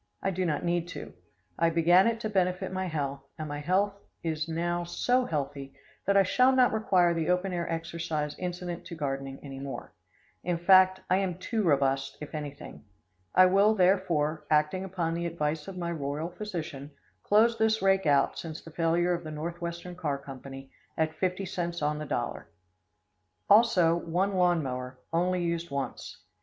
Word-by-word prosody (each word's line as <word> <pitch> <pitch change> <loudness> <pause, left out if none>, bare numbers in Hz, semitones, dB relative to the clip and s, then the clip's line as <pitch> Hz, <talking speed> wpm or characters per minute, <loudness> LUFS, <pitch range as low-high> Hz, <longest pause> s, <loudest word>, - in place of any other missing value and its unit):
I 195 - +1
do 185 0 -1
not 155 +2 -1
need 175 0 0
to. - - -8 0.5
I 165 0 +4
began 170 +4 +5
it 230 -1 0
to 215 - -1
benefit 185 -1 0
my 185 0 -2
health, 140 -4 -3 0.2
and 155 -1 -5
my 145 0 -4
health 190 +6 +1 0.3
is 160 -1 -2
now 175 +1 -1
so 245 +9 +1
healthy 140 - -4 0.3
that 200 0 +4
I 195 - +7
shall 250 +7 +4
not 255 -3 +4
require 185 -6 +3
the 165 -1 -1
open 180 +1 +1
air 170 -1 -2
exercise 165 -2 -3
incident 175 -1 -4
to 170 - -7
gardening 135 -3 -4
any 135 -2 -8
more. 135 0 -7 0.5
In 175 -1 0
fact, 185 +1 +5
I 185 - +3
am 190 -3 -1
too 220 +4 -2
robust, 135 -5 +1
if 150 - -8
anything. 145 -2 -7 0.5
I 185 - +8
will, 200 +4 +4
therefore, 170 -6 +1
acting 150 +5 +2
upon 180 -3 -2
the 170 +1 -2
advice 155 -2 -2
of 195 -1 -7
my 170 -1 -2
royal 150 +1 -3
physician, 170 -8 -6 0.3
close 230 +3 +3
this 220 -1 +2
rake 195 -3 +3
out, 140 -1 +3
since 160 -2 -6
the 165 - -13
failure 170 +2 +1
of 175 0 -3
the 155 - -6
Northwestern 170 +3 -5
Car 150 -6 -2
Company, 135 -1 -10 0.3
at 160 0 +1
50 185 +3 -1
cents 175 -3 -3
on 150 0 0
the 150 - -4
dollar. - - -3 1.0
Also 190 -7 +5
one 180 +4 -1
lawn 175 -3 +3
mower, 125 -1 -5 0.2
only 180 +1 +1
used 170 0 -2
once. 140 -1 -5
170 Hz, 175 wpm, -29 LUFS, 150-185 Hz, 1.0 s, I